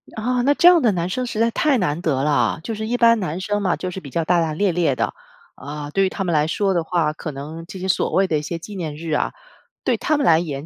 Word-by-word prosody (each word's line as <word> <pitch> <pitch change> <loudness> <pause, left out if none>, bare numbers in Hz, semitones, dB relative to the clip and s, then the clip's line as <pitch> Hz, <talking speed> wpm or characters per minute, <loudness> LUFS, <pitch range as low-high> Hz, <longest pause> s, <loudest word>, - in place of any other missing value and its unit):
啊， 245 +3 0
那 280 +4 +3
这 345 - +5
样 355 -3 +7
的 230 - +3
男 170 -1 -1
生 250 +8 -2
实 235 -3 -4
在 230 +1 +3
太 290 +2 +2
难 175 -6 -1
得 140 -6 0
了。 150 +1 +1
就 225 - -4
是 220 0 -4
一 245 - 0
般 230 -1 +5
男 180 -3 -3
生 205 +2 -1
嘛， 185 -3 +1
就 185 - -5
是 190 - -6
比 140 - -10
较 165 +4 -1
大大咧咧 170 -2 +1
的， - - -1 0.4
啊， 145 0 -7
对 195 +4 +2
于 190 - +1
他 195 - -4
们 175 -2 -1
来 150 0 +2
说 195 +4 0
的 170 -2 0
话， 160 -2 0
可 155 0 -6
能 155 +4 -8
这 190 - -8
些 190 - -4
所 185 - +1
谓 195 - +3
的 155 -4 +1
一 - - -5
些 165 +3 -4
纪 200 +5 -9
念 160 -5 -4
日 160 +1 -6
啊， 150 - 0 0.5
对 - - +2
他 305 - +1
们 285 - 0
来 160 -1 +5
言 150 -3 -5
175 Hz, 315 characters per minute, -21 LUFS, 155-215 Hz, 0.5 s, 样